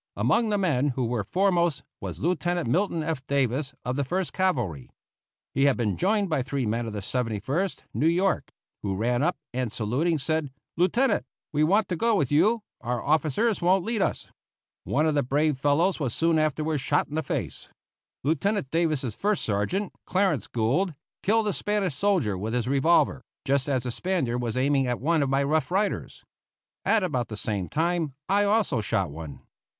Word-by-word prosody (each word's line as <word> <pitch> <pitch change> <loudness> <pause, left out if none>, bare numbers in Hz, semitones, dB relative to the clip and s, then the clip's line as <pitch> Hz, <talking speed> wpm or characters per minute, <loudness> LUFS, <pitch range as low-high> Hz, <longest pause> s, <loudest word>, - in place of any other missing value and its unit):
Among 230 -2 +2
the 205 - +1
men 150 -8 +1
who 130 - 0
were 115 -2 -1
foremost 175 - +1 0.2
was - - -6
Lieutenant 175 -1 0
Milton 170 - +1
F. 155 -4 -2
Davis, 135 0 0
of 125 +2 -1
the 140 - +1
First 180 +6 -2
Cavalry. 120 - -1 0.6
He 135 - +3
had 140 - +3
been 110 -5 0
joined 200 +2 +1
by 155 -6 0
three 135 0 -2
men 115 +2 -1
of 110 - -5
the 105 -1 -5
Seventy 115 -1 -2
first 165 - -2
New 155 - +2
York, 180 +3 +1 0.3
who 100 -2 -2
ran 120 +5 0
up, 175 +4 +1 0.2
and, 125 -3 -2
saluting, 130 +11 0
said, 155 +1 -1 0.3
"Lieutenant, 210 +10 +2 0.2
we 150 0 +2
want 200 +7 +3
to 180 - 0
go 230 +6 +2
with 145 -9 0
you, 215 +9 +3 0.2
our 120 0 -2
officers 155 - +1
won't 185 +1 +3
lead 225 -2 -1
us." - - -1 0.6
One 150 +3 +1
of 155 - +2
the 145 - +2
brave 145 +2 +1
fellows 155 +7 +2
was 130 -6 -1
soon 165 -1 +3
afterward 155 0 0
shot 145 +3 +1
in - - -11
the 160 - 0
face. 120 - -4 0.5
Lieutenant 160 +2 0
Davis's 155 -8 0
first 205 - -1
sergeant, 110 - -1
Clarence 185 - +1
Gould, 140 - 0 0.3
killed 220 +1 +2
a 205 - +1
Spanish 205 -5 -1
soldier 175 - +1
with 110 +5 -3
his 120 -1 -1
revolver, 140 +6 +3 0.2
just 140 0 +1
as 130 -3 +1
the 125 - -3
Spaniard 130 -7 -1
was 115 -1 -2
aiming 135 0 +2
at 125 -1 -1
one 160 +3 +2
of 140 - +1
my 135 +1 +2
Rough 150 0 +1
Riders. 195 +3 -1 0.6
At 225 -3 +3
about 130 -10 -1
the 110 - -6
same 100 -4 -2
time 165 -2 0
I 200 +1 +3
also 200 - +2
shot 95 -5 -1
one. 75 -2 -8
150 Hz, 185 wpm, -26 LUFS, 125-180 Hz, 0.6 s, He